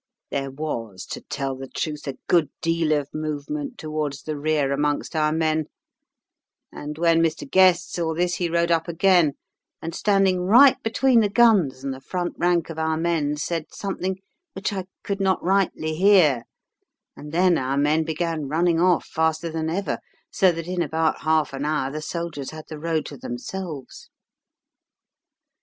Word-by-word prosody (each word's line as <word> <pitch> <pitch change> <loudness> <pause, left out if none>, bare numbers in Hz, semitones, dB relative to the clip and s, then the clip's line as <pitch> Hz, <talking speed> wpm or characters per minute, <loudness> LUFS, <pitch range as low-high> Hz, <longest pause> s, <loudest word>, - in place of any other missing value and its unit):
"There 135 -1 -2
was, 120 -9 -5
to - - -5
tell 135 -1 -4
the 135 +1 -8
truth, 150 +2 -4
a 135 - -4
good 165 -5 +3
deal 165 -1 0
of 145 -2 0
movement 155 - -4
towards 155 -3 -4
the 155 - -4
rear 145 -1 0
amongst 145 +3 -1
our 155 -1 +2
men, 155 -1 +1 1.1
and 150 +1 -7
when 165 0 +3
Mr. 160 -3 -1
Guest 185 +2 +4
saw 165 -2 -1
this 175 +1 0
he 175 -2 -1
rode 170 0 +1
up 165 0 +1
again, 170 -3 +3 0.5
and, 165 +1 -6
standing 195 -2 +2
right 245 +9 +6
between 240 +2 +3
the 210 -2 +2
guns 200 - +3
and 135 -1 -2
the 130 - -10
front 175 +5 -3
rank 175 -2 +1
of 160 - -7
our 160 0 0
men, 160 -3 0
said 160 +1 -3
something 190 -1 -3 0.4
which 195 +2 -3
I 190 -2 -3 0.2
could 200 -1 -3
not 190 -1 +1
rightly 185 -4 +1
hear, 165 - +4 0.7
and 150 - -10
then 175 +1 +3
our 130 +1 -1
men 150 +3 +2
began 160 -1 -2
running 165 +3 +2
off 180 -1 +3
faster 160 +1 -1
than 160 0 -2
ever, 195 +4 -2 0.3
so 190 -2 +4
that 165 -1 -5
in 180 -1 -1
about 160 0 0
half 155 -3 +1
an 135 +1 -4
hour 150 -3 -1
the 155 +2 -5
soldiers 160 -4 -4
had 155 -1 -9
the 155 - -7
road 160 -1 -1
to 145 - -8
themselves. 145 +5 -7
160 Hz, 170 wpm, -23 LUFS, 150-180 Hz, 1.1 s, right